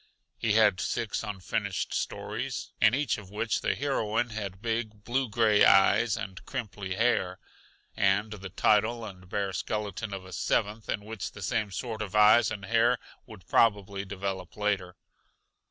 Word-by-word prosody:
He 110 -2 +1
had 105 -4 +4
six 110 -3 -2
unfinished 95 -4 -3
stories, - - -3
in 115 +1 +6
each 145 -5 0
of 100 -2 -12
which 105 +3 -1
the - - 0
heroine 120 -4 0
had 100 -3 -5
big, 110 -1 -3
blue 130 +2 0
gray 110 -1 +4
eyes 95 +3 +5
and 100 -4 -7
crimply 100 -7 -5
hair, 95 -5 +1 0.6
and 100 +2 +2
the 95 -2 -8
title 110 +5 +2
and 90 -3 -11
bare 100 -1 -2
skeleton 105 +1 -3
of 95 -1 -6
a 95 - -11
seventh, 105 +1 -1
in 105 -1 -2
which 110 -2 -6
the 100 - -9
same 105 +3 0
sort 110 +2 -5
of 105 -2 -5
eyes 105 +2 +6
and 105 -3 -6
hair 115 +3 +3 0.3
would 105 -4 -13
probably 100 -3 +2
develop 95 -2 -5
later. 100 -4 -1
105 Hz, 155 wpm, -28 LUFS, 95-115 Hz, 0.6 s, in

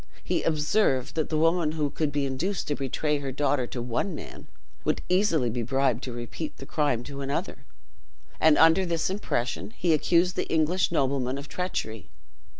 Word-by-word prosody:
He - - 0
observed, 150 - +1
that 160 -2 -1
the 155 - 0
woman 165 0 +2
who 150 -3 -1
could 155 -2 -1
be 145 -1 0
induced 155 +9 -2
to 145 - +1
betray 145 +2 -1
her 140 -1 -4
daughter 140 -2 0
to 120 -1 -5
one 125 +9 -2
man, - - -9 0.4
would - - 0
easily 180 -8 +3
be 120 +1 -2
bribed 130 0 +1
to 130 - -5
repeat 120 +6 -6
the 135 - -9
crime 140 -6 0
to 140 +2 -7
another, 140 +1 -3 0.7
and 155 -1 +5
under 165 +3 +6
this 170 0 0
impression, 160 - -2
he 175 -3 +2
accused 175 +3 +3
the - - -2
English 165 +4 +2
nobleman 135 -4 0
of 140 +1 -7
treachery. 115 - -4
150 Hz, 175 wpm, -27 LUFS, 130-165 Hz, 0.7 s, under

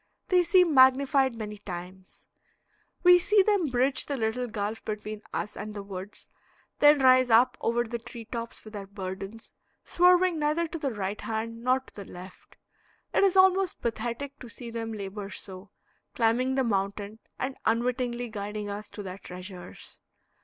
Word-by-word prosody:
They 365 -1 +5
seem 360 -2 +4
magnified 265 0 +5
many 210 -2 -6
times. 185 0 -9 0.8
We 355 0 +8
see 400 +3 +4
them 400 -5 +2
bridge 260 +1 +1
the 280 - -2
little 235 +2 -1
gulf 215 0 -4
between 215 0 -5
us 210 - -4
and 215 0 -7
the 205 - -5
woods, 195 0 -8 0.5
then 295 -1 +6
rise 255 -1 +6
up 245 +3 +5
over 235 +1 +1
the 235 0 -5
tree 235 0 -10
tops 230 0 -6
with 215 - -11
their 200 -2 -6
burdens, 195 +2 -7 0.3
swerving 360 -1 +4
neither 300 +3 +1
to 330 +1 -6
the 285 - -1
right 205 -3 -4
hand 230 +1 -4
nor 255 +1 +3
to - - -19
the 200 - -9
left. 180 +1 -12 0.6
It - - +3
is 390 -2 +4
almost 375 0 +4
pathetic 240 +4 -3
to 245 - -10
see 235 0 -8
them 225 -1 -4
labor 200 -1 -6
so, 190 -1 -9 0.5
climbing 245 +3 +2
the 265 - +2
mountain 200 0 -2 0.2
and 265 +1 -3
unwittingly 240 +1 0
guiding 210 -1 -5
us 205 +1 -6
to 205 - -7
their 190 0 -7
treasures. 180 0 -10
230 Hz, 165 wpm, -28 LUFS, 205-265 Hz, 0.8 s, We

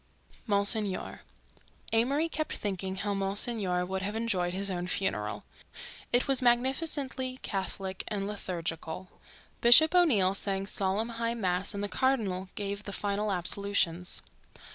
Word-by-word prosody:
MONSIGNOR 205 -1 +1 0.7
Amory 275 +8 +2
kept 310 -1 -3
thinking 190 -2 -3
how 200 +2 -2
Monsignor 195 -2 0
would 190 +1 -3
have 205 +3 -3
enjoyed 200 -6 0
his 195 +2 -2
own 175 -1 -3
funeral. 105 - -2 0.7
It 245 +1 +3
was 270 -2 +4
magnificently 260 +1 +1
Catholic 190 -1 -3
and 200 -2 -2
liturgical. 180 -3 -4 0.5
Bishop 280 +8 +8
O'Neill 235 - +4
sang 195 0 0
solemn 200 +3 -1
high 230 0 0
mass 190 -2 0
and 200 - -3
the - - 0
cardinal 205 -7 0
gave 200 0 -3
the 200 - -5
final 205 +1 -1
absolutions. 180 -1 -1
200 Hz, 125 wpm, -30 LUFS, 190-235 Hz, 0.7 s, Bishop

